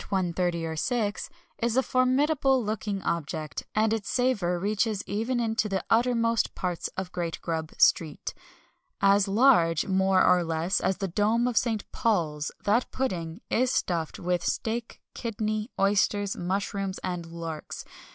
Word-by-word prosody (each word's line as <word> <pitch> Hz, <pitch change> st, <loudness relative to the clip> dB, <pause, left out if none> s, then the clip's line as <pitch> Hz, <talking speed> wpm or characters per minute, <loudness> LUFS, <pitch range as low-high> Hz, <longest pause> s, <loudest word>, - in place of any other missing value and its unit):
30 195 Hz, -, -2 dB
and 175 Hz, -3 st, -1 dB, 0.4 s
6.0, 215 Hz, -2 st, -1 dB, 0.3 s
is 235 Hz, +1 st, 0 dB
a 265 Hz, -, +4 dB
formidable 265 Hz, +1 st, +2 dB
looking 205 Hz, -2 st, -3 dB
object, 155 Hz, -3 st, -3 dB
and 215 Hz, +1 st, +3 dB
its 220 Hz, -3 st, -3 dB
savour 215 Hz, -9 st, +1 dB
reaches 210 Hz, +2 st, 0 dB
even 230 Hz, +4 st, -1 dB
into 225 Hz, -2 st, 0 dB
the 195 Hz, -1 st, -2 dB
uttermost 230 Hz, -1 st, +2 dB
parts 180 Hz, -2 st, -2 dB
of 190 Hz, -1 st, -4 dB
Great 170 Hz, -2 st, -3 dB
Grub 160 Hz, -1 st, -3 dB
Street. 155 Hz, -3 st, +2 dB, 0.7 s
As 200 Hz, 0 st, +4 dB
large, 195 Hz, -, +4 dB
more 190 Hz, 0 st, +3 dB
or 180 Hz, -1 st, +4 dB
less, 165 Hz, +3 st, 0 dB
as 190 Hz, -, 0 dB
the 195 Hz, 0 st, -2 dB
dome 215 Hz, +6 st, +2 dB
of 245 Hz, -, -2 dB
St. 220 Hz, -2 st, +1 dB
Paul's, 155 Hz, -9 st, 0 dB
that 215 Hz, +5 st, +2 dB
pudding 175 Hz, -11 st, -3 dB
is 255 Hz, +2 st, +2 dB
stuffed 165 Hz, -3 st, -1 dB
with 175 Hz, -1 st, -1 dB
steak, 230 Hz, +1 st, -2 dB
kidney, 215 Hz, -1 st, -3 dB
oysters, 200 Hz, 0 st, +2 dB
mushrooms, 195 Hz, +1 st, -2 dB
and 180 Hz, -2 st, -3 dB
larks. 165 Hz, -2 st, -6 dB
200 Hz, 140 wpm, -27 LUFS, 175-230 Hz, 0.7 s, a